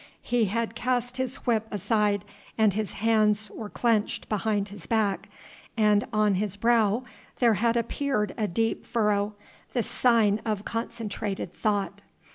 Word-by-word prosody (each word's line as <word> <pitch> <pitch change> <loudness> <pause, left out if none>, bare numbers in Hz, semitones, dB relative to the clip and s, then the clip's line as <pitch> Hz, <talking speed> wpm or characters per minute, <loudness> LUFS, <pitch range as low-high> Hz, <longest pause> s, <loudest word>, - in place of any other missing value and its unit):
He 240 -2 +2
had 225 +2 -1
cast 245 +1 -1
his 260 0 -2
whip 225 -3 +1
aside 205 0 +1 0.3
and 215 -3 +4
his 215 -1 -2
hands 215 -1 +2
were 215 -2 -7
clenched 225 -2 0
behind 210 -1 0
his 195 -6 -10
back, 210 -2 0 0.5
and 210 -2 +3
on 215 -2 +3
his 200 +1 -1
brow 230 +1 +2 0.3
there 235 -3 +4
had 230 +3 +1
appeared 235 -2 -1
a 215 - -1
deep 225 +5 -1
furrow, 210 -2 0 0.4
the 240 - +1
sign 220 -4 +3
of 210 -2 -2
concentrated 220 -5 -4
thought. 205 -2 -1
215 Hz, 140 wpm, -27 LUFS, 205-230 Hz, 0.5 s, and